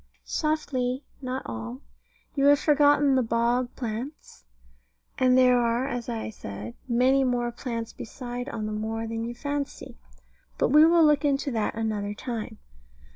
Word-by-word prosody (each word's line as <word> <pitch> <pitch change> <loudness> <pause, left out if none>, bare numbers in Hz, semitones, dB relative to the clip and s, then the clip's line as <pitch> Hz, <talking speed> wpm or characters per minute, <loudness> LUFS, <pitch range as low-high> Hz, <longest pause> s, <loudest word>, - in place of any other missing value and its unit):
Softly 275 -4 -1 0.2
not 255 0 -3
all; 115 +2 -6 0.5
you 275 -1 +1
have 285 0 +7
forgotten 290 -1 +4
the 260 - +4
bog 240 +2 0
plants; 235 - -6 0.7
and 255 0 +4
there 250 -1 +5
are 240 +2 +1
(as 245 -3 -4
I 225 -1 -3
said) 105 - -8
many 260 +3 +3
more 245 -2 0
plants 230 -2 -5
beside 245 +2 -6
on 220 -4 -4
the 215 - -3
moor 220 +1 -3
than 225 0 -3
you 240 +1 -5
fancy. 285 +1 -5 0.6
But - - +2
we 300 +3 +7
will 335 -1 +5
look 295 -1 +4
into 280 0 +1
that 220 -3 -1
another 210 -2 -2
time. 225 -1 -5
245 Hz, 150 wpm, -26 LUFS, 225-275 Hz, 0.7 s, have